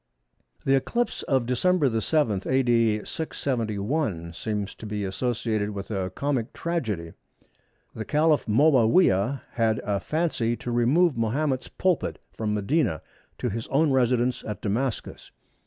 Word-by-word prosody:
The 135 - +3
eclipse 235 - 0
of 130 -3 +2
Dec. 130 -2 +2
7, 115 -9 +1
A.D. 115 -5 +2
671, 110 - -2
seems 105 +1 -3
to 110 - -9
be 105 -1 -3
associated 110 +1 -1
with 100 0 -6
a 95 -3 -1
comic 130 +3 -2
tragedy. 110 - -3 0.8
The 110 - -5
Caliph 150 +2 +2
Moawiyah 125 - +4
had 110 -2 +1
a 100 -1 0
fancy 150 - 0
to 120 - -5
remove 135 +7 +3
Mahomet's 130 +4 0
pulpit 185 -6 0
from 105 -1 -2
Medina 105 - 0 0.3
to 125 - -2
his 115 +2 -4
own 150 +2 +2
residence 125 -1 +2
at 105 - -5
Damascus. 115 +4 -3
120 Hz, 125 wpm, -26 LUFS, 105-140 Hz, 0.8 s, Moawiyah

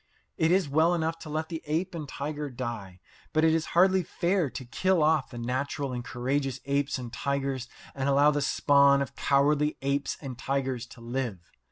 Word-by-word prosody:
It 160 +1 +2
is 185 -3 +3
well 160 +5 +3
enough 165 0 -1
to 155 - -9
let 155 +1 -3
the 165 -2 -4
ape 170 +5 -1
and 155 -4 -6
tiger 150 +1 -4
die, 115 -7 -6 0.3
but 155 0 +3
it 160 0 +5
is 160 -1 +1
hardly 190 +1 +5
fair 175 -2 0
to 130 +2 -7
kill 180 +7 +1
off 155 -2 +2
the 120 - -9
natural 130 +3 -2
and 120 -1 -4
courageous 135 +2 -2
apes 140 +1 0
and 120 -2 -7
tigers 135 -2 -2 0.2
and 135 0 -1
allow 140 +2 +5
the 145 0 -1
spawn 140 0 +4
of - - -10
cowardly 145 +2 +2
apes 140 +1 -1
and 130 -4 -7
tigers 130 -3 -2
to 115 - -14
live. 115 -7 -4
140 Hz, 190 wpm, -28 LUFS, 130-155 Hz, 0.3 s, it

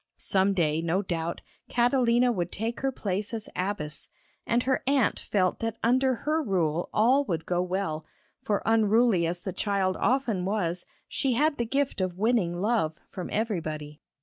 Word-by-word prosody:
Some 195 +1 +2
day, 160 -3 +1
no 170 +4 0
doubt, 170 -2 -3 0.3
Catalina 245 0 +3
would 180 -6 -2
take 225 +3 -3
her 270 0 0
place 205 -1 -2
as 220 - -5
abbess, 180 -5 -2 0.4
and 235 +1 +2
her 265 0 +1
aunt 275 -5 +2
felt 185 -3 0
that 225 -1 -3
under 260 +2 +3
her 305 +6 0
rule 175 - 0
all 255 +6 +4
would 165 - -2
go 175 0 0
well, 180 -4 -2 0.3
for 205 -1 -1
unruly 220 -4 +3
as 175 +1 -3
the 190 - -4
child 195 -2 0
often 240 -7 +1
was, 180 -3 -1 0.2
she 270 -3 0
had 295 +3 +1
the 235 - 0
gift 275 -3 0
of 185 -1 -2
winning 200 -5 +1
love 195 -7 +1
from 180 - -5
everybody. 155 -9 -3
200 Hz, 165 wpm, -27 LUFS, 175-235 Hz, 0.4 s, all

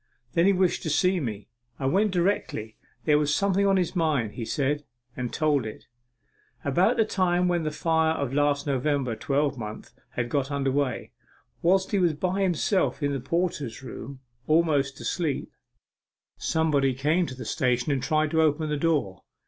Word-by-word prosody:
Then 170 +3 +4
he - - +6
wished 185 -1 +1
to 160 - -3
see 180 +5 +2
me. 105 - -5 0.3
I 135 - -4
went 195 +10 +3
directly. 175 - -1 0.3
There 150 -1 +4
was 150 -1 +1
something 200 +3 +2
on 195 -1 +4
his 180 0 -1
mind, 150 - +1
he 115 - -5
said, 145 +4 -1 0.3
and 125 -2 -3
told 150 -4 +1
it. 110 -1 -8 0.8
About 180 - +3
the 225 - +4
time 180 -3 +1
when 175 -1 +1
the 155 - -1
fire 160 +1 +1
of 140 -4 -3
last 145 0 +1
November 140 -3 0
twelvemonth 135 -3 -2 0.2
was 120 - +1
got 135 +1 -1
under, 140 -2 0 0.9
whilst 190 +2 +2
he 200 - +2
was 175 -3 +3
by 185 +5 -1
himself 185 -2 +1
in 145 0 +1
the 135 - -2
porter's 145 -4 -2
room, 130 +1 -8 0.3
almost 155 -4 +2
asleep, 160 -6 -2 0.8
somebody 145 -5 +1
came 155 +6 +1
to 130 - -7
the 125 -2 -8
station 125 +1 0
and 135 -2 0
tried 155 +1 +1
to 160 - +3
open 155 0 +1
the 150 - 0
door. 145 - 0
150 Hz, 170 wpm, -26 LUFS, 135-175 Hz, 0.9 s, he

